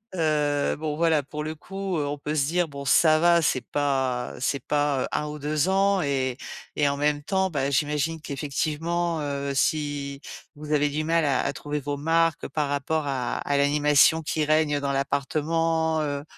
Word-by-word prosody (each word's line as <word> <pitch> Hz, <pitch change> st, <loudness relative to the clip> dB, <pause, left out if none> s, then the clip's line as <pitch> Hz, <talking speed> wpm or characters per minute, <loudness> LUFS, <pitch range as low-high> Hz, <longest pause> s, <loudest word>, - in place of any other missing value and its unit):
heu 150 Hz, -3 st, +1 dB
bon 150 Hz, -1 st, -3 dB
voilà 160 Hz, -3 st, +3 dB
pour 150 Hz, +2 st, -6 dB
le 155 Hz, -, -4 dB
coup, 190 Hz, +3 st, -5 dB
heu, 145 Hz, -, -1 dB
on 145 Hz, 0 st, -3 dB
peut 150 Hz, +2 st, -4 dB
se 140 Hz, -2 st, +1 dB
dire 175 Hz, +1 st, +1 dB
bon 140 Hz, -1 st, -8 dB
ça 155 Hz, +4 st, +4 dB
va, 170 Hz, 0 st, +4 dB
c'est 130 Hz, -, +1 dB
pas 135 Hz, -4 st, -1 dB
c'est 140 Hz, +2 st, 0 dB
pas, 145 Hz, -2 st, +1 dB
heu -, -, -2 dB
1 150 Hz, -, -1 dB
ou 150 Hz, 0 st, -6 dB
2 150 Hz, +4 st, 0 dB
ans 195 Hz, 0 st, +3 dB
et 135 Hz, -3 st, -1 dB, 0.4 s
et 145 Hz, -1 st, +2 dB
en 140 Hz, -, -2 dB
même 145 Hz, 0 st, +1 dB
temps, 190 Hz, +3 st, 0 dB
bah, 140 Hz, -2 st, 0 dB
j'imagine 150 Hz, +3 st, 0 dB
qu'effectivement, 160 Hz, +3 st, -2 dB
heu, 140 Hz, -1 st, -3 dB
si 140 Hz, 0 st, -1 dB, 0.4 s
vous 150 Hz, +1 st, -8 dB
avez 145 Hz, 0 st, +3 dB
du 150 Hz, +2 st, -2 dB
mal 165 Hz, 0 st, +2 dB
à 135 Hz, -3 st, +2 dB
à -, -, -1 dB
trouver 150 Hz, 0 st, -4 dB
vos 145 Hz, 0 st, -3 dB
marques 165 Hz, +2 st, +1 dB
par 150 Hz, -2 st, -2 dB
rapport 145 Hz, +2 st, -1 dB
à 130 Hz, -3 st, -2 dB
à 145 Hz, 0 st, -1 dB
l'animation 150 Hz, +2 st, +4 dB
qui 155 Hz, 0 st, -1 dB
règne 155 Hz, -1 st, +2 dB
dans 140 Hz, -1 st, -1 dB
l'appartement, 160 Hz, +3 st, 0 dB
heu 145 Hz, -1 st, -2 dB
150 Hz, 190 wpm, -25 LUFS, 140-160 Hz, 0.4 s, ça